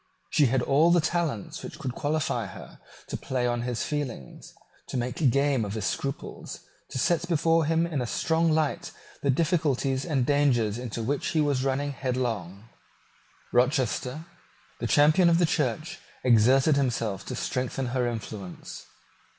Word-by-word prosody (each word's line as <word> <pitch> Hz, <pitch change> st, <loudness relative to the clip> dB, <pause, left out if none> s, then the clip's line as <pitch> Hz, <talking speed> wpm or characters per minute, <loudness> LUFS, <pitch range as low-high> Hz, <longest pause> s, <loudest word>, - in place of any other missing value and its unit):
She 145 Hz, -, +4 dB
had 125 Hz, +1 st, +1 dB
all 150 Hz, +5 st, +4 dB
the 175 Hz, 0 st, +5 dB
talents 160 Hz, -, -2 dB
which -, -, -8 dB
could 130 Hz, -3 st, -4 dB
qualify 145 Hz, -6 st, -1 dB
her -, -, -11 dB, 0.3 s
to -, -, -5 dB
play 125 Hz, -2 st, -2 dB
on 120 Hz, -1 st, 0 dB
his 120 Hz, -1 st, -2 dB
feelings, 140 Hz, -, -5 dB, 0.4 s
to -, -, -3 dB
make 125 Hz, +4 st, +1 dB
game 140 Hz, -1 st, +2 dB
of 100 Hz, 0 st, -4 dB
his 110 Hz, -3 st, -3 dB
scruples, 135 Hz, +6 st, -4 dB, 0.3 s
to -, -, -5 dB
set 170 Hz, +6 st, +1 dB
before 165 Hz, -1 st, +2 dB
him 165 Hz, +2 st, +2 dB
in 155 Hz, -6 st, -2 dB
a 120 Hz, -, -2 dB
strong 165 Hz, +5 st, +1 dB
light 155 Hz, -1 st, 0 dB, 0.3 s
the 140 Hz, -, 0 dB
difficulties 140 Hz, -3 st, +1 dB
and 140 Hz, -7 st, 0 dB
dangers 120 Hz, -6 st, +2 dB
into 115 Hz, -2 st, -4 dB
which 140 Hz, +5 st, -1 dB
he 160 Hz, -, 0 dB
was 145 Hz, -4 st, +1 dB
running 135 Hz, +1 st, 0 dB
headlong. 115 Hz, -7 st, -3 dB, 0.9 s
Rochester, 130 Hz, +3 st, +1 dB, 0.5 s
the -, -, -2 dB
champion 155 Hz, +5 st, +5 dB
of 165 Hz, -, +4 dB
the 175 Hz, -, +4 dB
Church, -, -, -1 dB, 0.2 s
exerted 130 Hz, +5 st, +5 dB
himself 115 Hz, -7 st, -1 dB
to -, -, -4 dB
strengthen 130 Hz, +1 st, -2 dB
her 125 Hz, 0 st, 0 dB
influence. 105 Hz, -5 st, -7 dB
135 Hz, 155 wpm, -27 LUFS, 120-155 Hz, 0.9 s, the